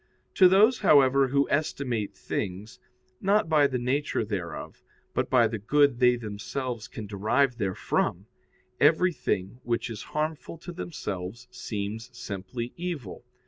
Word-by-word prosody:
To 185 - +7
those, 215 +6 +5
however, 135 -1 +5
who 140 +2 +2
estimate 130 -7 -1
things, 95 +5 -5 0.4
not 200 -1 +3
by 150 -3 +4
the 130 -2 -2
nature 130 0 -1
thereof, 95 -5 -5 0.3
but - - -1
by 120 -3 +5
the 110 -1 -4
good 140 +4 +3
they 125 -1 +5
themselves 115 +2 -5
can 110 - -7
derive 110 +7 +1
therefrom, 95 -3 -1 0.5
everything 145 - +2
which 120 0 -1
is 110 -1 -6 0.2
harmful 155 +1 -2
to 175 +2 -9
themselves 120 - -6
seems 110 -1 -5
simply 115 +4 -5
evil. 165 - -5
125 Hz, 130 wpm, -27 LUFS, 105-145 Hz, 0.5 s, To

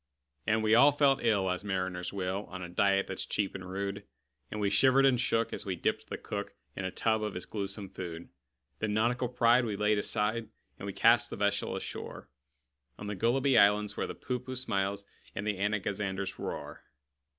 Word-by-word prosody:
And 110 0 +2
we 110 0 +3
all 140 +6 +8
felt 140 -2 +3
ill 105 -5 +2
as 90 - -3
mariners 95 -2 -2
will, 95 +1 -2
On 90 -1 -7
a - - -5
diet 100 +2 +2
that's 95 - -4
cheap 100 -2 -1
and 90 -1 -7
rude; 100 +1 -3 0.5
And 105 - -5
we 100 -1 +1
shivered 130 +6 +5
and 130 -3 +4
shook 115 -2 +1
as - - -3
we 95 -2 -2
dipped 85 - -1
the - - -4
cook - - -5 0.2
In 95 - -4
a - - 0
tub 110 +3 0
of 105 -2 -3
his 90 - -5
gluesome 100 -1 -4
food. 85 -3 -7 0.5
Then 105 -1 -1
nautical 120 +3 +1
pride 120 0 +4
we 110 -3 -2
laid 105 +1 +2
aside, 105 +2 -1 0.3
And - - -6
we - - -2
cast - - +4
the - - -5
vessel - - 0
ashore - - -6 0.7
On 105 - -8
the 105 0 -3
Gulliby 125 +5 +3
Isles, 105 +1 +4
where - - -2
the - - -6
Poohpooh 125 +1 -4
smiles, 100 -4 -1 0.3
And 100 - -3
the 105 -3 -1
Anagazanders 100 -1 -2
roar. - - -6
105 Hz, 195 wpm, -31 LUFS, 95-115 Hz, 0.7 s, all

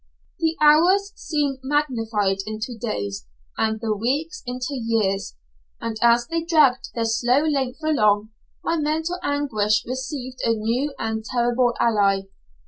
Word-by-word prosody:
The 325 0 0
hours 365 +7 +5
seemed 290 -4 -2
magnified 225 -8 0
into 215 +3 -4
days, 100 - -4 0.3
and 220 0 0
the 220 -1 -1
weeks 285 - -2
into 250 +3 -3
years; 225 - -1 0.4
and, 230 -1 -4
as 235 0 +4
they 330 +4 -2
dragged 305 -7 +3
their 230 -1 0
slow 245 +5 +2
length 280 -2 -1
along, 215 -8 +2 0.3
my 335 - 0
mental 320 +4 -1
anguish 220 - +1
received 255 0 -5
a 230 - +3
new 240 +7 -1
and 220 0 -3
terrible 240 0 +1
ally. 200 -4 +3
245 Hz, 135 wpm, -23 LUFS, 220-295 Hz, 0.4 s, hours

